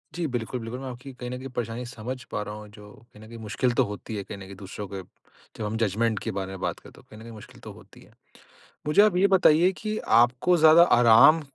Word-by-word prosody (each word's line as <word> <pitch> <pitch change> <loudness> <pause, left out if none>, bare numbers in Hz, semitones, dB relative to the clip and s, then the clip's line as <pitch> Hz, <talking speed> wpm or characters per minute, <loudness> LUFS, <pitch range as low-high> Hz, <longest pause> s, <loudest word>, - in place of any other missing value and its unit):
जी, 170 -1 -2
बिल्कुल, 125 -1 -4
बिल्कुल, 115 +2 -7
मैं 135 - -7
आपकी 130 +2 -10
कहीं 125 -1 -8
न 125 - -5
कहीं 130 - -8
परेशानी 120 0 -5
समझ 125 +2 -7
पा - - -3
रहा 105 - -7
हूँ, 105 0 -10
जो 105 -1 -15 0.2
कहीं 105 +1 -15
न - - -13
कहीं 115 +1 -11
मुश्किल 110 +3 -1
तो - - +2
होती 105 +2 -7
है, 100 - -4
कहीं 100 - -9
न - - -12
कहीं 95 0 -11
दूसरों 100 +1 -8
के 95 0 -7 0.6
जब 110 - -4
हम 105 +2 -3
जजमेंट 110 0 0
के - - -3
बारे 95 -1 -5
में 95 - -8
बात - - -3
करें, - - -16
तो - - -17
कहीं 110 - -16
न - - -13
कहीं 115 - -11
मुश्किल 110 - -14
तो - - -10
होती - - -18
है। - - -20 0.7
मुझे 170 +7 +5
आप 210 -4 +3
ये 190 +2 +4
बताइए 175 +1 +4
कि 215 0 -3 0.3
आपको 125 +9 +1
ज़्यादा 160 +1 +7 0.2
आराम 120 +7 +6
115 Hz, 260 wpm, -25 LUFS, 105-130 Hz, 0.7 s, ज़्यादा